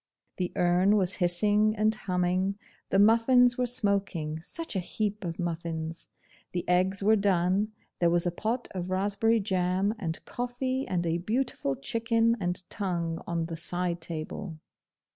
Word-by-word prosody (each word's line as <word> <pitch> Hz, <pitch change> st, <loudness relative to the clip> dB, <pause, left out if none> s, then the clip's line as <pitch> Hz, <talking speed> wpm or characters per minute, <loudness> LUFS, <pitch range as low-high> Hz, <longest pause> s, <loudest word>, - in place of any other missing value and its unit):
The 180 Hz, -1 st, -2 dB
urn 180 Hz, +4 st, +3 dB
was 185 Hz, -1 st, +1 dB
hissing 205 Hz, +4 st, +2 dB
and 215 Hz, 0 st, +2 dB
humming: 185 Hz, -1 st, 0 dB, 0.3 s
the -, -, +2 dB
muffins 235 Hz, +4 st, +5 dB
were 250 Hz, -, +2 dB
smoking 200 Hz, -9 st, 0 dB
such 325 Hz, -, -5 dB
a -, -, +2 dB
heap 210 Hz, +3 st, -3 dB
of 170 Hz, -2 st, -4 dB
muffins! 165 Hz, -2 st, -4 dB, 0.5 s
the 175 Hz, -, -3 dB
eggs 185 Hz, +2 st, +2 dB
were 215 Hz, +2 st, +5 dB
done, 195 Hz, +1 st, +2 dB, 0.3 s
there 170 Hz, -, +4 dB
was 170 Hz, +1 st, +2 dB
a 175 Hz, -, +1 dB
pot 225 Hz, +7 st, -2 dB
of 180 Hz, -1 st, -4 dB
raspberry 205 Hz, +4 st, +2 dB
jam, 190 Hz, 0 st, +1 dB
and 165 Hz, -6 st, -4 dB
coffee, 255 Hz, +2 st, -3 dB
and 175 Hz, -2 st, -1 dB
a 165 Hz, +1 st, 0 dB
beautiful 215 Hz, -, -1 dB
chicken 230 Hz, -, +1 dB
and 180 Hz, -1 st, -1 dB
tongue 170 Hz, -5 st, -2 dB
on 170 Hz, -1 st, -1 dB
the 165 Hz, 0 st, -5 dB
side 175 Hz, 0 st, -2 dB
table. 160 Hz, +2 st, -5 dB
190 Hz, 150 wpm, -28 LUFS, 175-215 Hz, 0.5 s, muffins